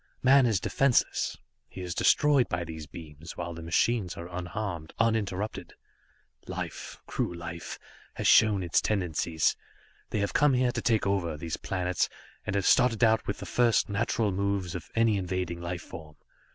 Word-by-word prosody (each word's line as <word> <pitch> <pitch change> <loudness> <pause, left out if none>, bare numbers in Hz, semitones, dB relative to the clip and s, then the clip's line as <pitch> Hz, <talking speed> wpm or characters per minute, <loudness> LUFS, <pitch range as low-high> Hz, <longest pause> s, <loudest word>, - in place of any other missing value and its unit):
Man 130 0 +6
is 110 -5 +2
defenseless, 135 +6 +1 0.3
he 95 - -8
is 90 -1 -4
destroyed 145 - +4
by 90 -1 -1
these 80 -2 -8
beams, 80 +1 -10
while 85 -1 -4
the 85 - -8
machines 90 +3 0
are 85 - -6
unharmed, 90 -3 -4
uninterrupted. 110 -3 -1 0.7
Life - - -6
cruel 85 - -2
life 85 0 -6 0.4
has - - -1
shown 105 -4 +5
its 85 -1 +2
tendencies. 85 -5 0 0.5
They - - -2
have 100 -1 -1
come 145 -3 +4
here 125 0 +2
to - - -3
take 115 -3 +2
over 90 -6 0
these 80 +1 -4
planets, 90 -1 -1 0.4
and 100 - -1
have 100 -2 0
started 125 -2 +4
out 110 -1 +3
with 100 - -2
the - - -7
first, 120 -3 +2
natural 105 +1 0
moves 100 -2 -1
of 90 - -7
any 115 -2 +3
invading 90 -2 -3
life 85 0 -4
form. 80 -2 -10
95 Hz, 165 wpm, -28 LUFS, 85-110 Hz, 0.7 s, Man